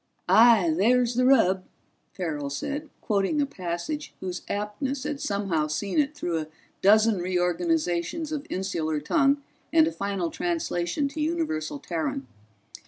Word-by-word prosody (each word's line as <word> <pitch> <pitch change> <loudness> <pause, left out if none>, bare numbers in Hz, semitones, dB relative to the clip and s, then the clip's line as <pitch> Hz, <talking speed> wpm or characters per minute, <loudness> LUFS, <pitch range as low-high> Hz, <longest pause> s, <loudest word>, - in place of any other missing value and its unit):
"Aye, 205 -3 +6
there's 240 +6 +3
the 250 +1 +2
rub," 190 -8 +4 0.5
Farrell 150 -6 -3
said, 285 - -4
quoting 210 +7 +1
a 285 - +3
passage 185 - -5
whose 180 -1 -4
aptness 260 +7 -3
had 295 -1 -4
somehow 195 -7 0
seen 190 - -1
it 295 +1 +1
through 175 - -2
a 155 - -5 0.3
dozen 215 +1 +5
reorganizations 175 - 0
of 300 0 -4
insular 165 -5 -1
tongue 280 - +2 0.3
and 320 0 +6
a 320 - -1
final 195 - -2
translation 295 - -1
to 305 +2 -5
universal 305 - -1
Terran. 160 -3 -3
200 Hz, 135 wpm, -26 LUFS, 170-280 Hz, 0.5 s, Aye